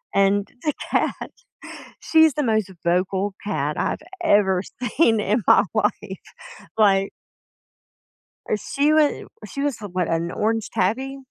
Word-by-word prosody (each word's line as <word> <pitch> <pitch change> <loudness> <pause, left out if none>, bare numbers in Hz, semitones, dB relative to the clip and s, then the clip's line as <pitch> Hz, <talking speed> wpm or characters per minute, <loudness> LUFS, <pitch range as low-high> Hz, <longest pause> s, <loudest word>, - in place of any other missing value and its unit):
and 200 +1 +2 0.2
the 300 - 0 0.2
cat, - - -1 0.7
she's 320 -2 +4
the 295 - 0
most 220 -5 0
vocal 185 +3 0
cat 150 -8 -2
I've - - -1 0.2
ever 195 - +3 0.2
seen 235 -2 +2
in 210 +3 0
my - - +6
life, - - -1 0.6
like 195 -2 +3 1.4
Er, - - +2
she 285 +7 0
wa 305 -2 +5 0.4
she 275 - -6
was 280 -5 -2
a 205 - -5
what, 180 -1 -1
an 165 +1 -1
orange 225 +2 -1
tabby? 230 +7 -1
210 Hz, 135 wpm, -22 LUFS, 190-270 Hz, 1.4 s, my